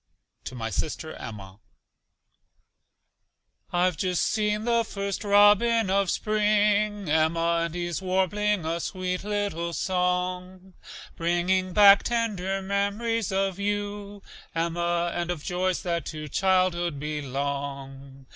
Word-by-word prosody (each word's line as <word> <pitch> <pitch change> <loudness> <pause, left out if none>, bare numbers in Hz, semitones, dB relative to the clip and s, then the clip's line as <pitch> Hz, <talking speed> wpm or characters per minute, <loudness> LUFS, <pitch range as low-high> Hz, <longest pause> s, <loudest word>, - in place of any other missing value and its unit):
(To 130 - -6
my 115 -2 -4
sister 155 - -3
Emma.) 100 -3 -9 2.1
I've 180 -1 +1
just 180 0 0
seen 210 0 0
the 235 -1 +2
first 200 -1 -4
robin 205 +1 +4
of 195 -1 +2
spring, 210 -1 +1
Emma, 165 +2 +2
And 170 0 -6
he's 175 0 -3
warbling 190 +1 0
a 165 +1 -1
sweet 185 +1 -3
little 200 -5 -2
song, 180 +1 -2 0.4
Bringing 180 +2 0
back 200 0 +8
tender 195 -5 -1
mem'ries 200 +3 -1
of 195 0 -1
you, 205 0 -3 0.3
Emma, 170 +1 0
And 175 0 -3
of 170 -4 -3
joys 185 0 -1
that 170 -4 -2
to 155 -1 -6
childhood 175 -2 +1
belong. 140 -2 -5
185 Hz, 110 wpm, -26 LUFS, 170-205 Hz, 2.1 s, back